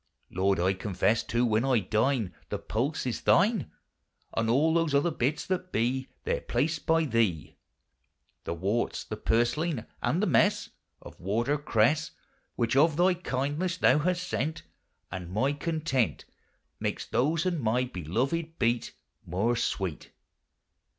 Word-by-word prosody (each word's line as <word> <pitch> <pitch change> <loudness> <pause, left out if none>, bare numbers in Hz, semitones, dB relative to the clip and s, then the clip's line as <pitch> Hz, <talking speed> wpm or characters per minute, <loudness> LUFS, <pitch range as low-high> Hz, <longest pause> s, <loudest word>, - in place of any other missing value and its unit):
Lord, 95 0 +1
I 95 +2 +2
confesse 100 +3 0
too, 120 +1 0
when 110 0 +2
I 135 -2 +3
dine, 110 +1 0 0.2
The - - -2
pulse 130 +8 -2
is 125 - -2
thine, 200 - +3 0.7
And 115 0 +1
all 150 +7 +3
those 165 -3 +2
other 145 +5 +3
bits 145 0 -1
that 185 -1 -2
bee 130 +4 0
There - - -1
placed 160 - -1
by 165 0 +3
thee; 110 - 0 0.9
The 85 - -2
worts, 100 +7 -1
the - - -5
purslain, 120 +3 0 0.2
and - - +1
the - - +2
messe - - +2 0.3
Of - - -12
water 115 +9 0
cresse, 145 +4 +2 0.5
Which 115 +1 0
of 150 +2 +4
thy 180 +1 +4
kindness 165 +2 -2
thou 150 - +4
hast 180 +3 -1
sent; 155 +6 -2 0.5
And 90 -2 -6
my 130 +9 +1
content 150 -5 -1 0.5
Makes - - -2
those 155 +6 +1
and 175 -4 0
my 120 +2 +1
beloved 125 - -2
beet 120 +1 0 0.3
More 105 +8 0
sweet. 95 -8 -3
130 Hz, 145 wpm, -28 LUFS, 110-160 Hz, 0.9 s, of